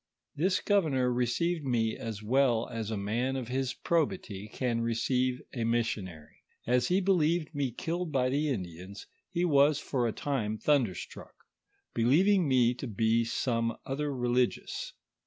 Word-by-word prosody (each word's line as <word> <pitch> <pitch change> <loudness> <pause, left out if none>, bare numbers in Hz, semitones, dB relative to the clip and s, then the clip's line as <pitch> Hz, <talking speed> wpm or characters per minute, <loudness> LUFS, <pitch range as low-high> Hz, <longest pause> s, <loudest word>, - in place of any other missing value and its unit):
This 185 +6 +1
governor 140 -11 +2
received 145 +8 0
me 115 -4 0
as 110 -2 -6
well 120 0 +2
as 115 -3 -4
a 110 - -2
man 115 +7 -1
of 125 -3 -4
his 130 -1 -1
probity 110 - -1
can 115 +1 -1
receive 125 +2 0
e 120 - -1
missionary. 105 -9 -2 0.2
As 125 +1 +2
he 185 +2 +3
believed 170 -4 +1
me 140 -3 -1
killed 165 +7 -3
by 130 -3 +2
the 145 +3 0
Indians, 95 -3 -5 0.2
he 175 0 0
was 145 -2 +4
for 130 -5 -1
a - - 0
time 110 -5 -2
thunderstruck, 125 -8 -1 0.6
be 115 - 0
lieving 180 - +4
me 125 -3 +4
to 125 - -6
be 110 +2 +2
some 115 0 -1
other 145 +2 -2
religious. 125 -1 -1
125 Hz, 150 wpm, -30 LUFS, 115-145 Hz, 0.6 s, was